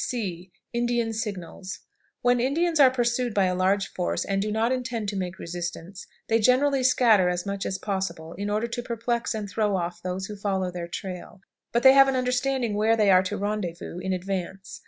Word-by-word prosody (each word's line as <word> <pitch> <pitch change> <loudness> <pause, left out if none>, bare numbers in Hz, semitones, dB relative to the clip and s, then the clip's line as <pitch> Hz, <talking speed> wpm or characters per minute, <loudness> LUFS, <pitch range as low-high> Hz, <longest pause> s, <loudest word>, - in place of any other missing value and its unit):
C. 185 -7 -4 0.2
Indian 240 -1 0
Signals. 195 -3 -5 0.4
When 245 0 +4
Indians 320 +6 +1
are 270 -2 +8
pursued 240 -2 0
by 200 -2 +4
a 180 - +1
large 195 +2 +1
force, 180 - -1
and 195 0 0
do 210 +1 -2
not 225 +3 +1
intend 245 -4 -2
to 200 - -5
make 185 -1 -3
resistance, 175 +2 -6 0.2
they 225 0 +3
generally 260 +4 +3
scatter 225 -7 +4
as 180 0 -2
much 200 -1 -3
as 190 - -2
possible, 190 -5 -4
in 205 +2 -4
order 210 +2 0
to 235 +1 -4
perplex 235 0 -2
and 210 -2 -4
throw 205 0 0
off 175 0 -4
those 185 +1 -3
who 210 - -7
follow 195 -2 -1
their 175 -1 -5
trail, 185 +1 -7 0.3
but 235 - +1
they 265 0 +9
have 275 0 +7
an 270 - +1
understanding 250 -2 0
where 220 +2 +2
they 210 -2 +4
are 185 0 +7
to 190 +2 -3
rendezvous 195 -4 -3
in 190 +1 -3
advance. 190 0 -4
205 Hz, 200 wpm, -26 LUFS, 185-240 Hz, 0.4 s, they